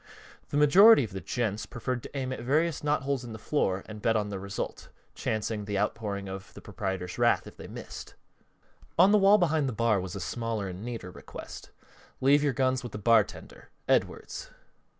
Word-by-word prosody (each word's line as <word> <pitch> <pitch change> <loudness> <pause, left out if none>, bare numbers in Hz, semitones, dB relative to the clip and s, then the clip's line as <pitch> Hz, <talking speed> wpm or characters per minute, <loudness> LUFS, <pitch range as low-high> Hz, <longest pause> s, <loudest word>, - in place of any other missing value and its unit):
The 145 - -1
majority 185 +7 +8
of 110 - -5
the 95 0 -6
"gents" 105 -3 -2
preferred 125 +1 -3
to 140 - -8
aim 130 -1 -2
at - - -6
various 150 +6 +1
knotholes 140 -3 0
in 120 -2 -8
the - - -6
floor 100 -6 0
and 105 -1 -9
bet 115 +1 +2
on 105 -1 0
the 100 -2 -4
result, 100 +1 -5 0.2
chancing 110 -1 -2
the 100 -1 -2
outpouring 100 -1 -2
of 95 +1 -7
the - - -9
proprietor's 95 -2 -4
wrath - - +3
if - - -11
they - - -10
missed. - - -9 0.8
On 185 +4 +7
the 210 - +6
wall 200 +2 +7
behind 160 -7 +1
the - - -4
bar 110 -3 +2
was 95 0 -6
a - - -4
smaller 115 -1 -3
and 95 +2 -7
neater 115 -6 -6
request: - - -10 0.5
"Leave 140 +2 +5
your 145 - +2
guns 130 -1 +1
with 120 -4 -8
the - - -4
bartender. 110 0 +1 0.2
Edwards." - - -1
115 Hz, 190 wpm, -28 LUFS, 100-140 Hz, 0.8 s, majority